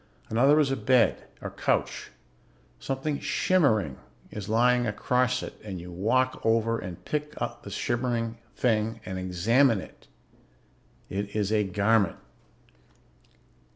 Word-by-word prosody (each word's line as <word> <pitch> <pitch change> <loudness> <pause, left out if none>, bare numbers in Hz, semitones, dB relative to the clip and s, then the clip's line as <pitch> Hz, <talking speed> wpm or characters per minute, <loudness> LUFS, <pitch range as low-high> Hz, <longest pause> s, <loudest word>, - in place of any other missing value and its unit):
Another 135 +7 +4
is 140 -3 +2
a - - +1
bed, 125 +1 +2 0.2
or - - -4
couch. - - -1 0.7
Something 140 +2 -2
shimmering 110 - +2 0.3
is 105 -1 -6
lying 120 +2 +3
across 125 +4 +1
it - - -9
and 95 -4 -6
you 90 +1 -9
walk 120 +9 +1
over 115 0 +2
and 90 -2 -8
pick 150 0 -3
the - - -5
shimmering 120 -2 -2 0.2
something 110 -2 +1
up 115 - -19
and 95 0 -4
examine 110 +7 +3
it. - - -13 1.0
It 100 +1 -4
is 105 -1 0
a 105 -1 +3
garment. 100 0 +2
115 Hz, 125 wpm, -27 LUFS, 100-125 Hz, 1.0 s, Another